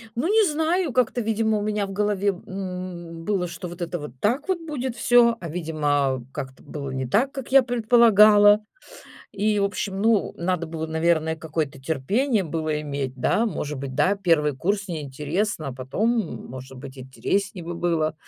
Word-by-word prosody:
Ну, 265 +8 0
не 430 +1 +4
знаю, 320 +1 0
как-то, 245 0 +1
видимо, 220 -1 +1
у - - -3
меня 210 -1 -1
в 195 - -7
голове, 205 0 +1 0.2
м, 180 -3 -6
было, 190 -3 0
что 170 +1 -7
вот 175 +1 -10
это 175 +1 -2
вот 150 -4 -7
так 245 - 0
вот 365 -2 +1
будет 265 -7 -4
всё, 235 -1 +4
а, 170 - -6
видимо, 145 -6 0
как-то 135 -3 -7
было 140 -2 -6
не 130 0 -3
так, 250 - +2
как 270 -3 -7
я 270 0 +8
предполагала. 215 -3 +6 0.7
И, 210 +1 +1
в 200 - +2
общем, 195 -1 -3
ну, 220 -1 +2
надо 170 -1 -1
было, 160 0 -4
наверное, 160 0 +1
какое-то 155 -3 -4
терпение 195 - 0
было 155 -1 -2
иметь, 140 -3 -4
да. 215 - +1
Может 150 - -3
быть, 135 -1 -6
да, 195 +7 +2
1 155 -7 +2
курс 200 +6 -1
не 160 -3 -4
интересно, 150 +5 -2
а - - -5
потом, 135 - -1 0.4
может 130 +1 -9
быть, 135 0 -10
интереснее 175 +8 -3
бы 175 0 -5
было. 165 -2 0
180 Hz, 175 wpm, -24 LUFS, 150-215 Hz, 0.7 s, я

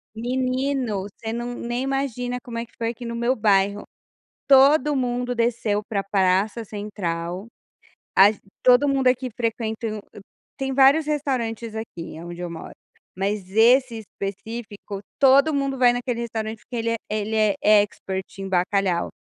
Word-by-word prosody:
Menino, 255 -2 -1
você 220 +3 -7
não 240 +1 -4
nem 240 +2 -3
imagina 260 -3 -2
como 235 -3 -7
é 230 - -3
que - - -29
foi 230 0 -1
aqui 240 +1 -7
no 235 0 -4
meu 235 +2 +1
bairro, 205 -2 +2 0.7
todo 280 +2 +6
mundo 245 -1 -1
desceu 230 -3 0
para 200 -3 -1
praça 200 +3 +1
central, 190 -3 -4 0.7
a 200 +2 +8
ge 215 - -12 0.2
todo 255 +3 +6
mundo 270 -2 +2
aqui 255 0 +1
frequentam 225 -2 -2 0.6
tem 270 0 -2
vários 275 +3 +5
restaurantes 240 -7 -2
aqui 175 -8 -7
aonde 175 +1 -8
eu 175 -1 -4
moro, 165 - -8 0.4
mas 195 0 -2
esse 235 +3 +4
específico 205 0 -7 0.2
todo 280 +3 +5
mundo 275 -1 -1
vai 245 -1 +5
naquele 245 -1 -2
restaurante 220 -1 -4
porque 240 0 -8
ele 230 0 -1
é - - +1
ele 215 +1 -2 0.3
é 210 -1 +6
expert 190 -2 -4 0.2
em 195 - -4
bacalhau, 185 -1 +1
230 Hz, 150 wpm, -23 LUFS, 205-255 Hz, 0.7 s, a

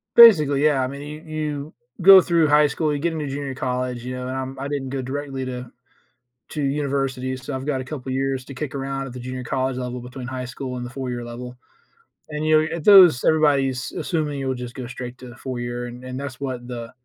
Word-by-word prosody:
Basically, 150 -12 +8
yeah, 140 -3 +3
I 130 - 0
mean, 140 +1 -7
you 150 +1 -8
you 155 -1 -4 0.3
go 190 +1 +10
through 170 -3 +3
high 150 0 +5
school, 150 +1 -1
you 145 - -2
get 170 +2 0
into 150 -3 -3
junior 140 0 -4
college, 125 -1 -2
you 125 +1 -4
know, 125 0 -5
and 130 - -3
I'm 130 0 -5
I 140 - -3
didn't 140 -2 -3
go 135 0 -3
directly 135 0 -4
to 125 -1 -6 0.8
to 150 - -4
universities, 135 -2 -1
so 145 - -4
I've 130 +1 -5
got 135 -3 -1
a - - -5
couple 135 -1 -7
of - - -1
years 135 -1 -1
to 135 - -9
kick 140 +1 -5
around 135 0 -3
at 125 - -9
the 125 - -7
junior 130 +1 -5
college 130 +1 -1
level 125 0 -4
between 125 0 -8
high 130 -1 -4
school 130 0 -6
and 125 - -4
the - - -6
4 130 0 -5
year 120 -1 -4
level, 125 +1 -8 0.7
and, 150 +1 -3
you 155 0 +5
know, 155 - 0
it 155 - -7
those 180 -10 +8
everybody 145 -4 +4
is 130 0 -4
assuming 150 -5 -2
you 135 - -3
will 130 - 0
just 125 -1 -7
go 130 -2 -6
straight 125 0 -7
to 125 - -10
the 120 - -13
4 130 -2 -5
year 120 0 -4
and 125 +2 -7
that's 140 -2 -6
what 130 -3 -4
the 120 -1 -6
135 Hz, 245 wpm, -23 LUFS, 125-145 Hz, 0.8 s, go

